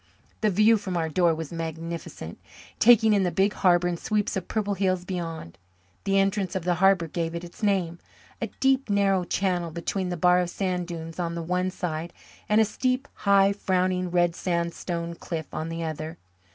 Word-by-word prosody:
The 215 - +3
view 215 +3 +5
from 190 -4 -4
our 160 -1 -1
door 170 +1 +3
was 160 -2 -6
magnificent, 165 0 -6 0.4
taking 220 -2 +6
in 200 - +3
the 180 - +2
big 195 +3 +1
harbour 175 -2 +3
and 175 -1 -2
sweeps 210 -1 -1
of 190 -2 -3
purple 205 -2 -1
hills 185 -2 0
beyond. 165 - -5 0.5
The 195 0 +2
entrance 195 0 +1
of 185 - -2
the 180 +1 +2
harbour 190 -3 +4
gave 165 +1 -3
it 170 - -5
its 175 +4 -12
name 185 -5 0 0.4
a - - -1
deep, 270 -2 +2
narrow 195 -2 +2
channel 175 -2 -1
between 175 +3 -3
the 175 - -3
bar 180 +2 +4
of 180 -1 0
sand 180 -1 -2
dunes 165 -1 -7
on 170 -1 -2
the 170 - -4
one 180 +2 0
side 170 -2 -4 0.4
and 210 +1 +4
a 220 - +5
steep, 255 +5 -1
high, 200 0 +4
frowning 185 -2 0
red 175 -1 +2
sandstone 170 -1 -2
cliff 165 -1 -5
on 155 +1 -3
the 165 0 -4
other. 160 +1 -5
180 Hz, 190 wpm, -26 LUFS, 170-195 Hz, 0.5 s, taking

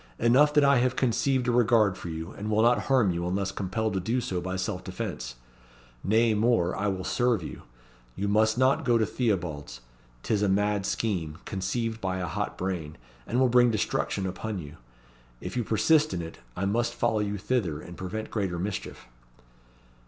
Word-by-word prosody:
Enough 140 +6 +4
that 150 - +6
I 140 -1 +5
have 125 +1 +1
conceived 130 0 +1
a - - +3
regard 115 -4 +4
for 90 - -7
you, 80 +2 -5
and 105 +2 -6
will 110 +1 +3
not 120 +1 +3
harm 125 -8 +3
you, 85 0 -2
unless 95 +1 -1
compelled 100 +3 -2
to 95 - 0
do 115 +8 0
so 95 -7 -2
by 95 +1 -3
self 95 -1 -3
defence. 60 0 -5 0.7
Nay 110 +3 +3
more, 105 -5 +2
I 105 - -1
will 95 -2 -2
serve 120 -5 +1
you. - - -7 0.5
You 100 - -2
must 110 +2 +3
not 130 +2 +3
go 120 -2 +3
to 110 - +2
Theobalds. 85 - -2 0.4
'Tis 105 -2 0
a 105 - +2
mad 100 0 +1
scheme, 90 -8 -2
conceived 115 +4 -2
by 95 -1 -1
a 90 - -2
hot - - -3
brain, 85 -5 -4 0.3
and 120 - 0
will 130 - +5
bring 120 0 +5
destruction 100 -3 -1
upon 100 +3 -4
you. 75 -5 -8 0.6
If - - -6
you 120 - 0
persist 150 - +3
in 85 - -3
it, 80 - -9 0.2
I 95 - -1
must 115 +4 0
follow 120 -2 +1
you 105 0 -1
thither, 95 -8 -1
and 85 - -10
prevent 95 +5 -5
greater 95 -5 -1
mischief." 95 +3 -5
105 Hz, 190 wpm, -27 LUFS, 95-120 Hz, 0.7 s, that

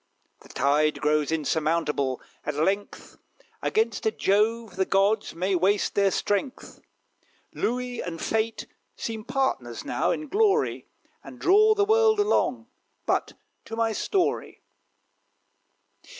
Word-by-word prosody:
The - - -18
tide 150 +2 +1
grows 150 0 +1
insurmountable, 155 -3 0 0.2
at 150 - -3
length; 195 +7 -2 0.4
Against 440 +1 0
a - - +3
Jove 220 - 0
the 190 0 +1
gods 200 +1 +1
may 185 +3 -1
waste 190 +3 +1
their 200 -1 +3
strength. 205 +7 -3 0.7
Louis 250 0 -2
and 165 -2 -6
Fate 225 +1 -1 0.3
seem 220 -1 -5
partners 265 +2 -2
now, - - 0
in 305 - -2
glory, 425 +5 +1 0.4
And - - -11
draw 430 +3 +5
the 405 -1 +2
world 440 0 +4
along. 415 +1 +1 0.4
But - - 0 0.3
to 225 - -6
my 230 0 +1
story. 360 - -1
215 Hz, 120 wpm, -26 LUFS, -, 0.7 s, draw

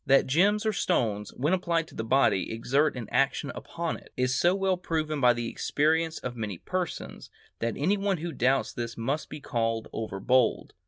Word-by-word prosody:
That 135 0 +5
gems 200 +10 +3
or 220 - +2
stones, 105 - 0
when 150 +7 +1
applied 170 -3 0
to - - -15
the 110 - -3
body, 115 -6 +2
exert 135 +7 +1
an 115 -4 -5
action 135 +1 +1
upon 170 -1 -4
it, - - -18
is 130 0 +1
so 175 +7 +3
well 195 -1 +1
proven 155 -4 -2
by 125 -1 +6
the 120 -1 -3
experience 160 +6 +1
of 125 -1 -5
many 105 -5 -4
persons, 185 - -4 0.3
that 115 -1 -2
any 185 +8 +2
one 195 -1 0
who 170 +2 -4
doubts 135 -1 +1
this 115 -1 -5
must 135 +7 -2
be 150 - -7
called 115 -4 -2
over 110 -3 -4
bold. 125 +6 +2
140 Hz, 195 wpm, -28 LUFS, 115-170 Hz, 0.3 s, by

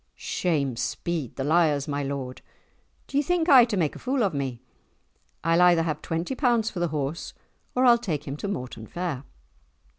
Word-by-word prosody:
"Shame 140 -8 -1
speed 150 +2 -3
the 135 - -3
liars, 150 -2 +2
my 145 -1 -2
lord! 135 -2 -4 0.6
Do 280 - -3
ye - - +5
think 340 +2 0
aye 260 -7 +8
to 220 -4 -2
make 160 -5 0
a - - -9
fool 260 -1 0
of 195 -5 +1
me? 135 -4 -3 0.8
I'll 165 +2 +3
either 175 -2 +5
have 155 -2 -2
twenty 165 +9 -2
pounds 240 -4 +1
for 180 - -5
the 175 - +1
horse, 150 +1 -4 0.4
or 255 +1 +3
I'll 240 -1 +6
take 175 - -3
him 135 - -3
to 200 - -4
Mortan 125 - -5
fair." 165 -7 -4
165 Hz, 185 wpm, -26 LUFS, 140-215 Hz, 0.8 s, aye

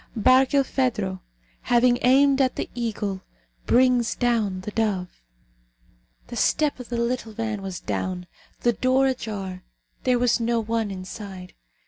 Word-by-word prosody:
BARKILPHEDRO, 255 -5 +2 0.4
HAVING 245 0 +3
AIMED 275 +2 +4
AT 260 -1 +1
THE - - -4
EAGLE, 210 -5 -3 0.5
BRINGS 250 -1 +3
DOWN 220 -6 0
THE 210 - -6
DOVE. 200 - -2 1.0
The - - -9
step 300 -3 +1
of 250 - -9
the 240 - -2
little 235 -1 -2
van 220 -2 -3
was 190 -2 -5
down 180 -1 -3 0.4
the 240 - +3
door 260 +4 +2
ajar 205 -8 -3 0.4
there 250 -1 +3
was 245 0 +2
no 235 0 +1
one 225 -1 -1
inside. 190 -1 -8
230 Hz, 130 wpm, -24 LUFS, 200-250 Hz, 1.0 s, AIMED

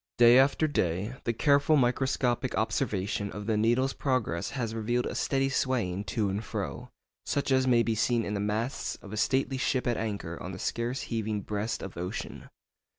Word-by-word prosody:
Day 120 +1 +8
after 140 +3 +3
day, 95 - -1
the 115 - +2
careful 145 +5 +4
microscopic 125 -1 +1
observation 100 -2 -1
of 105 0 -6
the 110 0 +1
needle's 120 +5 +2
progress 115 -10 -1
has 115 -4 -3
revealed 120 +2 0
a - - -3
steady 135 -1 +1
swaying 115 -8 0
to 110 -3 0
and 100 +3 -2
fro, - - -5 0.3
such 140 -1 -1
as 130 0 +3
may 120 -2 +5
be 115 - 0
seen 115 +1 +1
in 105 - -3
the 100 - -1
masts 110 +6 -2
of 100 - -9
a - - -3
stately 130 +3 +1
ship 130 -1 0
at 120 -2 +1
anchor 100 -6 -4
on 95 +3 -6
the - - -6
scarce 120 +6 -2
heaving 110 -3 -2
breast 105 +3 -3
of 95 -3 -7
ocean. 90 +5 -5
115 Hz, 185 wpm, -29 LUFS, 105-130 Hz, 0.3 s, Day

